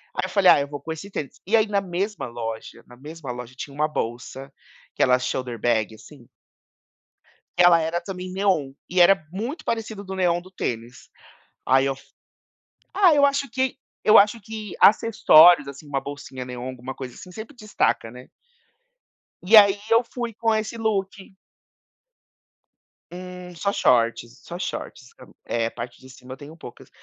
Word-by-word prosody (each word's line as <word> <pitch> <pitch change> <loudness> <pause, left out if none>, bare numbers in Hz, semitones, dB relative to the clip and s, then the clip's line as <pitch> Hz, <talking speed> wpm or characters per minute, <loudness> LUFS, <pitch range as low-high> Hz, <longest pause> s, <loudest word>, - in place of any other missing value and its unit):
aí 185 - -1
eu - - -6
falei: 195 -3 +5
"Ah - - +5
eu 140 - -3
vou 145 0 -8
com 160 - -6
esse 195 +5 -10
tênis". 145 -7 -6
E 225 - +3
aí 215 0 +2
na 200 -1 0
mesma 195 +2 -3
loja 115 -1 -7
na 120 - -16
mesma 150 -1 -8
loja 125 0 -8
tinha 140 +2 -8
uma 150 +1 +1
bolsa, 130 +1 -5 0.4
aquela 125 0 +3
shoulder 125 -2 -4
bag 110 -2 0
assim 125 +1 -16 1.3
que 180 - +5
ela 170 -1 +7
era 165 +2 -2
também 185 0 -7
neon 185 -8 0 0.2
e 180 +1 0
era 175 -3 +5
muito 245 - -5
parecido 220 -3 -4
do 190 0 -7
neon 175 -2 +1
do 185 - -15
tênis, 120 -8 -6 0.6
aí 135 +1 +4
eu 135 - 0
f - - -18 0.9
ah, 375 -5 +6
eu 285 -1 +5
acho 280 -1 -1
que 260 +2 -1 0.3
eu 215 - +7
acho 210 +3 +4
que 215 -1 -8
acessórios, 175 -7 +6
assim, 140 +2 -10
uma 140 -1 -1
bolsinha 140 -2 -8
neon, 125 0 -7
alguma 130 +1 -8
coisa 125 -2 -8
assim 185 - -12
,sempre 220 +7 -9
destaca, 215 - -1
né. 125 +1 -13 1.1
E 215 +5 +6
aí 200 -1 +7
eu 230 +1 +4
fui 235 -1 -6
com 225 +1 0
esse 220 +1 -2
look. 195 -3 -3 1.8
Eh, 180 0 -9
só 200 +4 -1
shorts, 120 - +1
só 175 - -8
shorts. 160 -7 -6
sabe. 125 - -16
É, 115 -1 -1
a - - -6
parte 120 +1 -8
de 130 0 -15
cima 130 0 -11
eu - - -11
tenho 155 +3 -12
poucas. 120 - -12
175 Hz, 175 wpm, -23 LUFS, 130-205 Hz, 1.8 s, ela